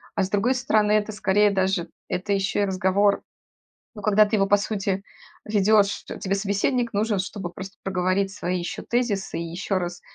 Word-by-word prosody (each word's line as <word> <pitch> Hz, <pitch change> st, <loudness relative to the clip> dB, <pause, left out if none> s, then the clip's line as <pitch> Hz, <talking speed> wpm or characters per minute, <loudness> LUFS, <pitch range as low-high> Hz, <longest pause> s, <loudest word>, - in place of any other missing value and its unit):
а 195 Hz, -, +2 dB
с 190 Hz, -, -2 dB
другой 215 Hz, +6 st, +2 dB
стороны, 215 Hz, -4 st, +2 dB
это 215 Hz, 0 st, +2 dB
скорее 205 Hz, 0 st, +3 dB
даже, 190 Hz, -3 st, 0 dB, 0.2 s
это 190 Hz, +3 st, -2 dB
ещё 200 Hz, +1 st, 0 dB
и 205 Hz, -, +3 dB
разговор, 190 Hz, +2 st, +2 dB, 0.7 s
ну, 210 Hz, -, -8 dB
когда 215 Hz, 0 st, +5 dB
ты 210 Hz, -, 0 dB
его 195 Hz, -2 st, +3 dB
по 205 Hz, +1 st, +5 dB
сути 200 Hz, -2 st, -2 dB, 0.4 s
ведёшь, 210 Hz, -1 st, +3 dB
те -, -, -7 dB
тебе 195 Hz, 0 st, -1 dB
собеседник 215 Hz, +5 st, 0 dB
нужен, 210 Hz, 0 st, +1 dB
чтобы 185 Hz, -1 st, -4 dB
просто 195 Hz, +2 st, -9 dB
проговорить 190 Hz, +1 st, 0 dB
свои 180 Hz, -2 st, -2 dB
ещё 175 Hz, -, -5 dB
тезисы 225 Hz, -8 st, -1 dB
и -, -, -3 dB
ещё 185 Hz, +3 st, -2 dB
раз 175 Hz, 0 st, -5 dB
200 Hz, 185 wpm, -24 LUFS, 190-210 Hz, 0.7 s, когда